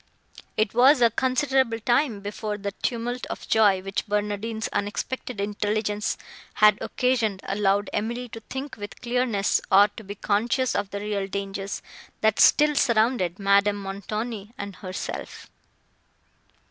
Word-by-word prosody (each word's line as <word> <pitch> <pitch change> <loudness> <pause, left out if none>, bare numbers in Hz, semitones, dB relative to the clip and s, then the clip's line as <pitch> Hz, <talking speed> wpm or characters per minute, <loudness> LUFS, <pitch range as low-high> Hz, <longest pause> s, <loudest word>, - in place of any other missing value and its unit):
It 215 -1 +1
was 255 +4 +6
a 235 -2 +5
considerable 260 -1 +1
time, 240 -1 +1
before 210 +1 -4
the 200 0 -4
tumult 240 +3 -3
of - - -7
joy, 205 -4 +4
which 195 +3 -3
Barnardine's 210 +2 -2
unexpected 215 +3 -3
intelligence 210 +1 -1 0.4
had 210 0 +5
occasioned, 235 -7 0
allowed 200 0 +1
Emily 240 +3 -2
to 225 - -8
think 265 +4 -7
with 205 -1 -8
clearness, 240 -4 +1
or 200 +2 +7
to 220 - -11
be 200 0 -7
conscious 235 +6 0
of 200 - -1
the 200 0 -5
real 205 -2 -2
dangers, 195 0 -4 0.4
that 220 -1 +2
still 300 0 +6
surrounded 225 - +2
Madame 200 +1 +3
Montoni 210 +3 -5
and 200 -1 -6
herself. 185 -2 -6
210 Hz, 135 wpm, -25 LUFS, 200-240 Hz, 0.4 s, or